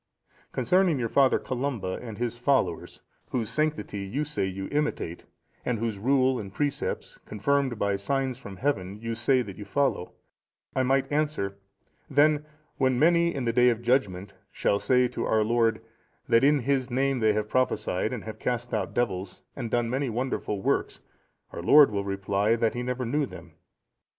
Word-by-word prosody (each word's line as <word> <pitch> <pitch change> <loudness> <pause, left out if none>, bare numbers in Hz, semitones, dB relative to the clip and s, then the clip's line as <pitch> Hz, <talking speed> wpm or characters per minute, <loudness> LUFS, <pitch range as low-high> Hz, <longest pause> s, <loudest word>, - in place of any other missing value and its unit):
Concerning 180 -4 +2
your 120 -2 -1
Father 135 +3 +4
Columba 125 -8 -3
and 115 -4 -8
his 120 -1 -2
followers, 120 - 0 0.3
whose 115 -4 -2
sanctity 155 -10 -1
you 100 +10 -2
say 150 -9 -2
you 95 +1 -5
imitate, 145 - -2 0.4
and 125 - -1
whose 110 -2 -3
rule 130 +2 +2
and 100 -2 -7
precepts 145 -1 -2
confirmed 135 +3 0
by 100 -1 0
signs 130 +6 -1
from 100 -8 -9
Heaven 100 -8 -1
you 115 +1 -4
say 125 +3 +2
that 100 -5 -9
you - - -5
follow, 130 -3 -1 0.6
I 130 - +2
might 135 +2 +1
answer, 145 -10 -1 0.5
then 150 +1 +4 0.3
when 130 -2 +2
many, 170 +3 +4
in 135 -3 -2
the 115 - +1
day 125 +1 +5
of 120 -1 -1
judgement, 100 -6 0 0.2
shall 100 - +1
say 125 +1 +3
to 125 - -3
our 110 -1 +3
Lord, 115 0 +1 0.4
that 115 0 +4
in 145 0 +4
His 135 0 0
name 135 +1 +1
they 110 -2 +3
have 105 0 -1
prophesied, 110 -5 0
and 125 -4 -5
have 110 - -8
cast 120 0 -2
out 105 -4 -2
devils, 95 -6 -2
and 120 -4 -4
done 120 +1 +1
many 130 +3 -1
wonderful 115 -4 -2
works, - - 0 0.5
our - - -6
Lord 140 - +7
will 100 -1 -1
reply, 100 +2 0
that 115 -1 +1
He 120 - -3
never 125 0 -2
knew 145 +4 0
them. - - -12
120 Hz, 175 wpm, -27 LUFS, 105-135 Hz, 0.6 s, Lord